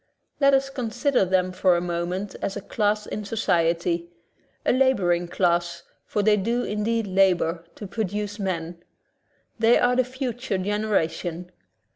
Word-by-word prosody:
Let 275 Hz, -1 st, +5 dB
us 270 Hz, 0 st, 0 dB
consider 250 Hz, -1 st, 0 dB
them 185 Hz, 0 st, +1 dB
for 185 Hz, -1 st, +3 dB
a -, -, +1 dB
moment 175 Hz, +3 st, -3 dB
as 195 Hz, -, -2 dB
a -, -, -5 dB
class 210 Hz, +1 st, 0 dB
in 210 Hz, -, -5 dB
society, 170 Hz, -4 st, 0 dB, 0.6 s
a -, -, +3 dB
laboring 195 Hz, -10 st, +2 dB
class, 170 Hz, -1 st, 0 dB, 0.2 s
for 210 Hz, -, 0 dB
they 210 Hz, 0 st, +4 dB
do 235 Hz, +5 st, 0 dB
indeed 220 Hz, +2 st, -1 dB
labor 185 Hz, -3 st, +2 dB
to 210 Hz, -, -8 dB
produce 205 Hz, 0 st, -3 dB
men. 170 Hz, -3 st, -3 dB, 0.8 s
They 230 Hz, +1 st, +5 dB
are 245 Hz, 0 st, +3 dB
the 255 Hz, -, +4 dB
future 250 Hz, -4 st, -3 dB
generation. 180 Hz, -4 st, -1 dB
200 Hz, 140 wpm, -24 LUFS, 175-230 Hz, 0.8 s, Let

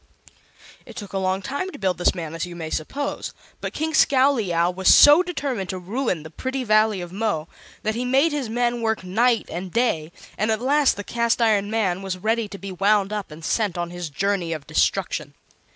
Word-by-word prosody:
It -, -, -13 dB
took 205 Hz, -3 st, -8 dB
a 195 Hz, -, 0 dB
long 190 Hz, +1 st, -1 dB
time 285 Hz, -, -3 dB
to -, -, -9 dB
build 185 Hz, -4 st, -1 dB
this 175 Hz, -, +2 dB
man, 165 Hz, -3 st, -5 dB
as 165 Hz, -, -4 dB
you 175 Hz, -, -9 dB
may 160 Hz, -2 st, -6 dB
suppose; 280 Hz, -, -3 dB, 0.3 s
but -, -, -4 dB
King 315 Hz, +1 st, -3 dB
Scowleyow 225 Hz, -, +3 dB
was 190 Hz, +1 st, +3 dB
so 295 Hz, +4 st, +8 dB
determined 275 Hz, -, -3 dB
to 185 Hz, -, -3 dB
ruin 185 Hz, -, -2 dB
the 160 Hz, -, -10 dB
pretty 260 Hz, +8 st, -3 dB
Valley 215 Hz, -3 st, +3 dB
of 175 Hz, -1 st, -7 dB
Mo 195 Hz, -6 st, -2 dB, 0.4 s
that 215 Hz, -, 0 dB
he 240 Hz, +3 st, -2 dB
made 270 Hz, +6 st, +3 dB
his 285 Hz, -6 st, -3 dB
men 240 Hz, +1 st, 0 dB
work 220 Hz, -3 st, -1 dB
night 225 Hz, +5 st, +1 dB
and 180 Hz, +2 st, -5 dB
day, 170 Hz, -10 st, 0 dB, 0.3 s
and 215 Hz, +2 st, +1 dB
at 220 Hz, -1 st, +1 dB
last 280 Hz, +3 st, +3 dB
the 205 Hz, -, -6 dB
Cast 235 Hz, +3 st, 0 dB
iron 210 Hz, -3 st, +2 dB
Man 195 Hz, -5 st, 0 dB
was 190 Hz, -1 st, -4 dB
ready 220 Hz, +3 st, 0 dB
to 200 Hz, -, -9 dB
be 195 Hz, 0 st, -7 dB
wound 200 Hz, +2 st, +2 dB
up 210 Hz, -2 st, -4 dB
and 160 Hz, +1 st, -10 dB
sent 210 Hz, -6 st, 0 dB
on 175 Hz, 0 st, -3 dB
his 175 Hz, -2 st, -5 dB
journey 180 Hz, +2 st, -1 dB
of 155 Hz, -3 st, -7 dB
destruction. -, -, -1 dB
205 Hz, 210 wpm, -23 LUFS, 180-240 Hz, 0.4 s, so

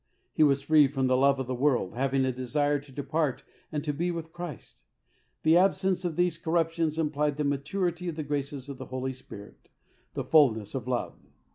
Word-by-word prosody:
He -, -, 0 dB
was 140 Hz, -2 st, +4 dB
free 150 Hz, 0 st, +5 dB
from 135 Hz, -1 st, -1 dB
the 130 Hz, 0 st, +3 dB
love 135 Hz, +1 st, +3 dB
of 130 Hz, -, -2 dB
the 130 Hz, -, -3 dB
world, 125 Hz, -7 st, +1 dB
having 135 Hz, +2 st, +1 dB
a 130 Hz, -, +1 dB
desire 145 Hz, +4 st, 0 dB
to 140 Hz, 0 st, -16 dB
depart 145 Hz, +1 st, -2 dB, 0.3 s
and 150 Hz, -2 st, -2 dB
to 150 Hz, -2 st, -1 dB
be 170 Hz, +5 st, -1 dB
with 165 Hz, -2 st, -5 dB
Christ. 175 Hz, -, -8 dB, 0.6 s
The 160 Hz, +1 st, +5 dB
absence 190 Hz, 0 st, +2 dB
of 175 Hz, -3 st, -2 dB
these 175 Hz, -1 st, +1 dB
corruptions 165 Hz, -1 st, 0 dB
implied 150 Hz, -2 st, 0 dB
the 150 Hz, -, 0 dB
maturity 170 Hz, +5 st, -1 dB
of 165 Hz, -, -5 dB
the 155 Hz, -, -3 dB
graces 140 Hz, -2 st, -3 dB
of 140 Hz, -1 st, -8 dB
the 130 Hz, -, -7 dB
Holy 130 Hz, +1 st, -3 dB
Spirit 105 Hz, -5 st, -12 dB, 0.2 s
— -, -, -38 dB
the -, -, -2 dB
fulness 115 Hz, -10 st, +3 dB
of 130 Hz, -3 st, -4 dB
love. 125 Hz, -2 st, -2 dB
145 Hz, 205 wpm, -28 LUFS, 130-160 Hz, 0.6 s, free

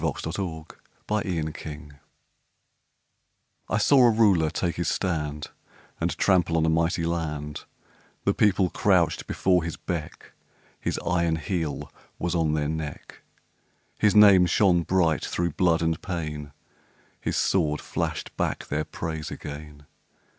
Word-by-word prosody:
VERSE: -, -, -2 dB
THE 80 Hz, -, -3 dB
THREE 85 Hz, 0 st, -4 dB
RULERS 75 Hz, -1 st, -8 dB, 1.8 s
I -, -, +1 dB
saw 140 Hz, -2 st, +5 dB
a 120 Hz, -, +7 dB
Ruler 100 Hz, -8 st, +4 dB
take 85 Hz, +2 st, -2 dB
his 85 Hz, -2 st, -1 dB
stand 75 Hz, -5 st, -2 dB, 0.5 s
And -, -, -1 dB
trample 90 Hz, -4 st, +3 dB
on 80 Hz, -, +2 dB
a -, -, +2 dB
mighty 80 Hz, +1 st, +1 dB
land; 75 Hz, -3 st, -3 dB, 0.6 s
The -, -, +3 dB
People 95 Hz, -3 st, +2 dB
crouched 90 Hz, -5 st, +2 dB
before 90 Hz, -3 st, +2 dB
his 85 Hz, -, -4 dB
beck, 85 Hz, -4 st, -6 dB, 0.5 s
His -, -, -2 dB
iron 85 Hz, -2 st, +1 dB
heel 80 Hz, -1 st, -3 dB, 0.2 s
was 85 Hz, -, -2 dB
on 80 Hz, -3 st, +1 dB
their 75 Hz, -1 st, 0 dB
neck, 80 Hz, -1 st, -6 dB, 0.8 s
His 105 Hz, -1 st, +3 dB
name 100 Hz, -4 st, +8 dB
shone 90 Hz, -3 st, +3 dB
bright 85 Hz, -2 st, +1 dB
through 85 Hz, -1 st, -1 dB
blood 85 Hz, +1 st, +2 dB
and 80 Hz, -1 st, 0 dB
pain, 75 Hz, -5 st, -5 dB, 0.7 s
His -, -, -2 dB
sword 75 Hz, -6 st, +1 dB
flashed -, -, -4 dB
back -, -, -2 dB
their 75 Hz, +1 st, -1 dB
praise 80 Hz, -2 st, -5 dB
again. 75 Hz, -1 st, -9 dB
80 Hz, 130 wpm, -26 LUFS, 75-90 Hz, 1.8 s, name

